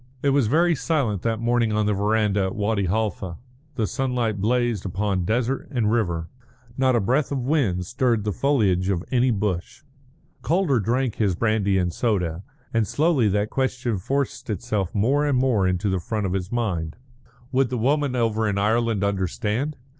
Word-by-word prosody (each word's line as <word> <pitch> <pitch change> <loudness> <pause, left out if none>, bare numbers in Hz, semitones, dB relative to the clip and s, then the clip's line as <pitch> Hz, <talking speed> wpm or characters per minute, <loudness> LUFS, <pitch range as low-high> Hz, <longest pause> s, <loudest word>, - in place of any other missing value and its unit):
It 140 - +3
was 135 -4 +3
very 170 +7 +3
silent 135 - 0
that 115 -1 -1
morning 120 -1 +1
on 105 0 +1
the 105 - +2
verandah 105 0 +1
at 95 - -3
Wadi 105 -1 0
Halfa; 95 -3 -2 0.4
the 110 - 0
sunlight 120 -4 -1
blazed 120 -2 +1
upon 95 -1 -1
desert 125 +6 -1
and 120 -6 0
river; 85 -8 0 0.5
not 130 -1 +2
a - - +3
breath 130 +9 +1
of 140 - 0
wind 120 - +1
stirred 120 0 0
the 105 - -1
foliage 100 -9 +1
of 90 -3 0
any 130 0 +3
bush. 105 +2 -2 0.6
Calder 165 -7 +2
drank 120 +2 0
his 100 -5 +1
brandy 105 -2 +1
and 90 -2 0
soda, 90 -8 -1 0.3
and 115 -2 +1
slowly 150 -7 +2
that 105 +1 0
question 125 -5 -1
forced 135 +3 -2
itself 105 -3 -2
more 130 +8 +2
and 140 -3 +2
more 125 -7 +2
into 90 +2 0
the 95 -1 0
front 105 +4 -3
of 95 - -1
his 95 -1 -3
mind. 95 -10 -2 0.6
Would 130 -1 +2
the 125 - -2
woman 140 +3 +1
over 110 -2 +1
in 100 - -1
Ireland 110 0 +1
understand? 105 - -1
110 Hz, 175 wpm, -24 LUFS, 100-125 Hz, 0.6 s, It